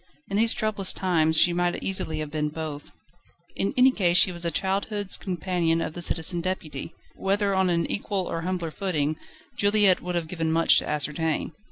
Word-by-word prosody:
In 200 - 0
these 225 +1 +4
troublous 215 -4 0
times 160 -4 +1
she 175 - +5
might 175 0 0
easily 185 -5 -1
have 155 -1 -4
been 150 -1 -1
both. 150 -2 -7 0.6
In 195 - -1
any 255 +1 +6
case 180 -7 +2
she 185 - +6
was 170 -1 -5
a 170 - 0
childhood's 195 +2 -1
companion 175 -2 -1
of 160 - -3
the 175 - -7
Citizen 170 +1 0
Deputy 165 -5 -5 0.2
whether 200 +1 0
on 190 -1 +2
an 170 -1 +1
equal 200 -2 -2
or 165 - -3
a - - -6
humbler 175 -2 -3
footing, 155 -5 -1 0.4
Juliette 205 -2 +3
would 180 0 -4
have 170 -2 -2
given 165 -1 -2
much 165 +1 +5
to - - -6
ascertain. 150 +2 -1
175 Hz, 190 wpm, -25 LUFS, 160-195 Hz, 0.6 s, any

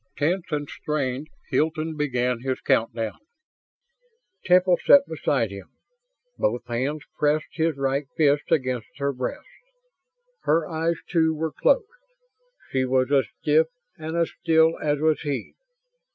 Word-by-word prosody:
Tense 170 +5 0
and 145 -2 -2
strained, 140 -2 -3 0.2
Hilton 160 0 0
began 125 -5 0
his 130 0 -2
countdown. 115 -1 0 1.3
Temple 180 0 +4
sat 280 0 +7
beside 135 -8 0
him. 100 -1 -9 0.7
Both 120 +2 0
hands 130 +5 -2 0.2
pressed 150 +1 +2
his 160 -3 0
right 135 +1 -1
fist 145 -1 +2
against 130 -7 -1
her 140 0 -1
breast. 125 -1 -4 1.0
Her 160 +1 +2
eyes, 165 0 0
too, 160 -2 +2
were 160 +1 -2
closed; - - +3 0.9
she 130 -1 +1
was 130 +1 +1
as 140 -2 +3 0.2
stiff 155 +2 +4 0.3
and 160 +1 -4
as 170 -1 +1
still 160 0 +4
as 150 -1 0
was 155 0 +2
he. 140 -6 -4
150 Hz, 130 wpm, -24 LUFS, 130-160 Hz, 1.3 s, sat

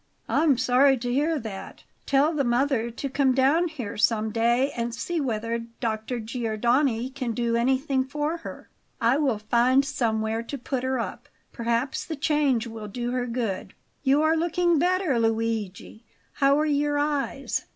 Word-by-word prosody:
"I'm 300 -5 +3
sorry 260 +2 +4
to 245 0 -3
hear 305 +4 +1
that; 220 -7 -8 0.2
tell 285 +3 +3
the 290 -3 +1
mother 240 -1 +1
to 235 +4 -5
come 270 -1 +2
down 285 +7 +3
here 245 -9 -6
some 215 +1 +2
day 235 +5 +2
and 235 0 -3
see 340 +5 -2
whether 230 -2 -2 0.2
Dr. 225 +1 -2
Giordani 235 +2 0
can 255 -4 -3
do 235 0 0
anything 260 +2 +1
for 295 +4 -2
her. 330 - -9 0.3
I 235 +2 +3
will 270 -7 +1
find 240 +5 +3
somewhere 220 -3 -1
to 255 +5 -6
put 260 0 -3
her 260 0 0
up; 230 - -5 0.2
perhaps 235 +2 -1
the 320 - -5
change 280 -5 +1
will 225 -2 -7
do 240 +4 -4
her 250 -1 -1
good. 225 -6 -3 0.3
You 280 +2 +3
are 315 +1 +3
looking 345 0 +2
better, 355 -6 +1
Luigi; 225 -2 -2 0.3
how 280 +1 +3
are 305 - +2
your 290 -1 +1
eyes?" 290 -1 -1
255 Hz, 160 wpm, -25 LUFS, 230-285 Hz, 0.3 s, sorry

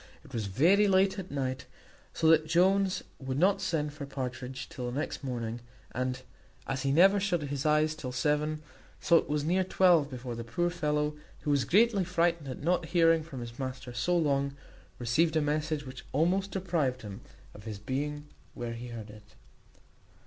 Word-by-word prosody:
It - - -15
was 110 -3 -2
very 175 - +4
late 190 0 +3
at 185 - -7
night, 130 -2 -3 0.4
so 160 - 0
that 155 -1 +5
Jones 185 +3 +3 0.2
would 130 -1 -3
not 190 +5 +3
send 150 -3 -1
for 145 -2 -7
Partridge 130 -1 -5
till 125 -1 -5
the 125 +4 -3
next 150 - -4
morning; 120 -3 -3 0.3
and, 130 0 -3 0.4
as 135 -1 -2
he 135 - 0
never 190 +7 +6
shut 180 -5 0
his 140 0 -2
eyes 155 +1 +3
till 145 -5 -6
seven, 150 +4 0 0.4
so 170 - +5
it - - -1
was 150 0 0
near 180 +5 +2
twelve 175 -5 +4
before 125 -2 -6
the 115 0 -5
poor 175 +10 -1
fellow, 150 -3 0 0.3
who 150 - -1
was 140 -2 +2
greatly 210 0 +4
frightened 170 -3 0
at 130 +2 -6
not 175 +1 +1
hearing 165 -1 +4
from 145 -5 -8
his 120 +1 -8
master 130 -1 -5
so 175 +9 +1
long, 140 -3 +1 0.4
received 155 +7 +1
a - - +4
message 150 0 -1
which 130 -1 -9
almost 180 +7 +2
deprived 165 - -1
him 100 -2 -8 0.3
of 105 - -13
his 110 -2 -5
being 145 +7 -3 0.3
when 120 -1 -4
he 120 +1 -7
heard 115 -3 -8
it. 105 0 -16
150 Hz, 185 wpm, -30 LUFS, 130-170 Hz, 0.4 s, never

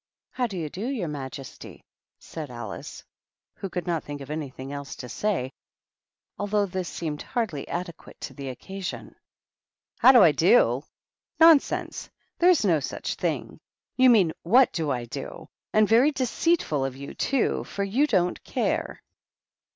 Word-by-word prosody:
"How 250 -1 -1
do 195 -4 -6
you 160 -3 -3
do, 195 +10 -5
your 245 -10 -2
majesty?" 135 -2 -8 0.3
said 155 -4 -8
Alice, 120 -4 -8 0.5
who 195 - -6
could 180 -1 -4
not 170 -3 -1
think 145 0 -7
of 140 +1 -8
anything 140 -3 -6
else 140 -1 -6
to 125 - -8
say, 130 - -1 0.9
although 205 0 +1
this 185 -2 -4
seemed 155 -3 -4
hardly 210 - -3
adequate 175 -1 -6
to - - -6
the 140 -2 -6
occasion. 190 +9 -7 0.4
" - - -68
How - - +8
do 245 -6 +8
I 165 - +7
do? 145 - +4 0.6
Nonsense 325 -3 +4
I - - -56 0.2
There 350 - +6
is 345 -11 +4
no 165 -5 +3
such 135 - -4
thing - - -3
I - - -11
You 260 - +8
mean, 195 -9 +5
what 240 +8 +5
do 160 -3 -1
I 125 -3 -1
do? 115 - -7 0.2
And 215 -1 +4
very 235 +7 +5
deceitful 260 - 0
of 135 -1 -3
you, 140 +1 -8
too, 275 -3 0
for 200 - -3
you 240 +10 +2
don't 180 -8 +1
care." - - -2
175 Hz, 165 wpm, -26 LUFS, 145-225 Hz, 0.9 s, How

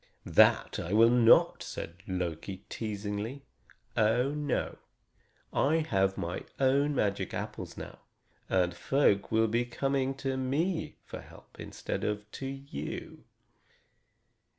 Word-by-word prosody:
"That - - +4
I 85 - -3
will 115 +2 +6
not," 120 -2 +5
said 85 +1 -6
Loki 90 +1 -4
teasingly. 105 +4 -4 0.5
"Oh, 120 +5 +3
no! 145 -2 -2 0.7
I 145 +4 +3
have 95 -10 +1
my 85 +1 -3 0.2
own 140 +2 +3
magic 100 -5 0
apples - - -5
now, - - -8 0.5
and 90 -2 +2
folk 100 -1 +2
will 110 0 +4
be 115 +3 +1
coming 135 +2 -1
to 135 -1 -2
me 155 +7 -1
for - - -7
help - - -17
instead - - -5
of 105 0 -2
to 135 - -5
you." 135 - -6
115 Hz, 120 wpm, -30 LUFS, 100-135 Hz, 0.7 s, will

